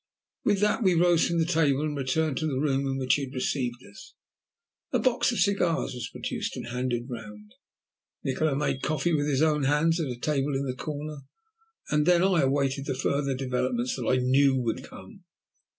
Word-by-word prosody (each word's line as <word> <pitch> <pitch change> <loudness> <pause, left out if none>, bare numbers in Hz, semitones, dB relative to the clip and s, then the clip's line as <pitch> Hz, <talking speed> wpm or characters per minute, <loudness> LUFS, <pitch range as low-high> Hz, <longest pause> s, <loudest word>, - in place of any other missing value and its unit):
With 205 -2 +2
that 210 +4 +2
we 185 -5 +3
rose 175 0 +4
from 170 - -1
the 165 - +2
table 155 -5 +2
and 150 -1 -2
returned 140 +1 0
to 155 - -1
the 135 -4 -2
room 135 -1 0
in 135 0 -1
which 130 -1 +2
he 140 0 0
had 135 - -11
received 125 -1 -2
us. 100 - -14 0.8
A - - +2
box 250 -1 +2
of 235 - -3
cigars 180 -8 +1
was 125 -1 -5
produced - - -4
and - - -6
handed 125 -1 -2
round; 105 -4 -9 0.7
Nikola 140 +2 0
made 140 -2 -1
coffee 155 +2 0
with 145 -1 +1
his 145 0 +2
own 150 -3 +2
hands 155 +4 +2
at 160 - -1
a 125 - -5
table 140 +1 -1
in 135 +1 -1
the 130 - -2
corner, 150 +2 -5 0.7
and 150 +1 +2
then 175 0 +5
I 185 -3 +3
awaited 135 0 0
the 135 - -1
further 140 +1 0
developments 125 -1 -1
that 125 -3 -4
I 130 - +3
knew 130 +2 +3
would 120 -3 -2
come. - - -13
140 Hz, 200 wpm, -27 LUFS, 130-155 Hz, 0.8 s, then